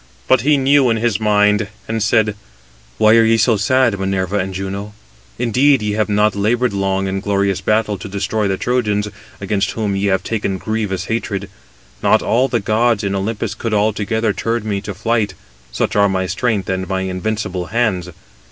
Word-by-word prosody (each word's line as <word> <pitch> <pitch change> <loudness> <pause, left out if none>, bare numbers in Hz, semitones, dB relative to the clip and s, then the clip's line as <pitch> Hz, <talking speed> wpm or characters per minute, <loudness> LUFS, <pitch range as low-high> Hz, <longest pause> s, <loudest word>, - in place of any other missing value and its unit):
But 130 -3 +4
he 145 +3 +3
knew 135 -1 +4
in 115 - +2
his 110 -3 0
mind, 105 -1 +2 0.2
and 110 0 -2
said: 110 -1 +2 0.6
"Why 110 0 +5
are 115 - +6
ye 115 0 +3
so 110 +1 +3
sad, 115 0 +2
Minerva 95 0 -1
and 95 +1 -2
Juno? 95 +2 -5 0.4
Indeed, 130 +2 +3
ye 105 - -1
have 105 +1 0
not 105 0 +2
laboured 115 +4 +1
long 95 0 0
in 95 0 -2
glorious 100 -1 0
battle 105 0 0
to 95 - -7
destroy 100 +2 -1
the 95 -1 -1
Trojans, 105 -4 0 0.3
against 100 0 -1
whom 105 -3 -2
ye 100 +1 0
have 95 -2 +1
taken 100 -4 -2
grievous 100 -3 -3
hatred. 100 -4 -3 0.5
Not - - +3
all 125 +4 +2
the 120 -3 0
gods 115 +3 +1
in 100 -1 -1
Olympus 105 +2 -2
could 110 +1 -3
altogether 110 +1 0
turn 115 0 -2
me 100 -2 -1
to 100 -1 -6
flight, 105 -1 -1 0.4
such - - -1
are 100 -1 +4
my 95 -1 -1
strength 100 +2 -1
and 95 -1 -2
my 95 -1 -1
invincible 95 -1 -3
hands. 100 -5 0
105 Hz, 180 wpm, -18 LUFS, 95-115 Hz, 0.6 s, are